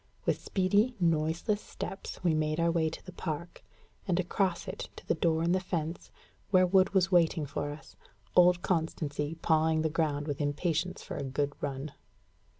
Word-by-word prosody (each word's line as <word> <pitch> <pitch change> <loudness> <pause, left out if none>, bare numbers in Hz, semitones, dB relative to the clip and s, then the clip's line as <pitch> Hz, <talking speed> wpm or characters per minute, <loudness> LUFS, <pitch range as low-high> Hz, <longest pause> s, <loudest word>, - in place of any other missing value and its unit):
With - - +1
speedy, 205 +6 +2
noiseless 165 +5 +1
steps, 195 - -7
we 170 -3 +3
made 155 +1 0
our 170 0 +3
way 165 -1 +1
to 155 - -10
the 185 - -8
park, 170 -1 -5 0.4
and 180 -1 +1
across 185 0 0
it - - -5
to - - -12
the - - +3
door 165 0 +1
in 170 - +2
the 185 - +3
fence, 170 -3 -4 0.4
where 185 -2 +5
Wood 190 +2 +3
was 190 0 +3
waiting 165 -3 +3
for 145 +1 -3
us, 145 +1 -10 0.4
old 180 0 +6
Constancy 155 -3 -1
pawing 160 0 +3
the 160 - +1
ground 150 -3 0
with 145 -1 -3
impatience 160 +4 -1
for - - -6
a - - -3
good 140 +2 -1
run. 140 +1 -3
165 Hz, 175 wpm, -30 LUFS, 155-180 Hz, 0.4 s, old